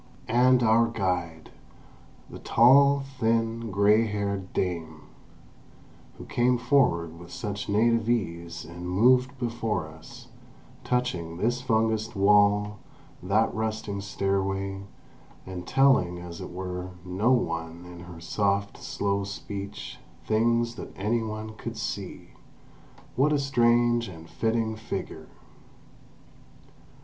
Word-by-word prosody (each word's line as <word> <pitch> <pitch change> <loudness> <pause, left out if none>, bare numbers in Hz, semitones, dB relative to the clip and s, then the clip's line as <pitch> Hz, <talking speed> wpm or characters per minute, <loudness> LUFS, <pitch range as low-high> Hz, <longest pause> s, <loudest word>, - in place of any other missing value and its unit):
And 125 +2 +4
our 115 +1 +4
guide, 90 -7 -3 0.8
the - - -10
tall, 140 +4 +5 0.2
thin, 115 0 0
grey 105 +3 +4
haired 100 -2 -3
dame, 80 -4 -3 1.2
who - - -9
came 125 +1 +2
forward 115 - +1
with 85 0 -12
such 105 -2 -5
native 115 +2 +2
ease 85 -8 -2
and 85 +2 -7
moved 125 +7 +3
before 115 -8 -2
us, 120 +11 -13 0.5
touching 90 -10 -2
this 120 +6 0
fungused 110 -3 0
wall, 105 +1 +3 0.4
that 105 +5 +1
rusting 110 -2 -3
stairway, 95 0 -2 0.6
and 90 -2 -7
telling, 135 -10 +3
as 85 -1 -8
it - - -6
were, 90 0 -5 0.2
no 95 +7 +1
one 85 -7 -1
in 90 -1 -11
her 85 -1 -10
soft, 100 +3 -1
slow 100 0 -1
speech, 100 0 -7 0.3
things 115 +2 +2
that - - -9
any 110 +4 0
one 110 0 -5
could - - -7
see—what 140 +4 -5
a 150 - +3
strange 120 -3 +2
and 80 -3 -11
fitting 115 -1 0
figure! 110 0 -6
105 Hz, 110 wpm, -27 LUFS, 90-115 Hz, 1.2 s, tall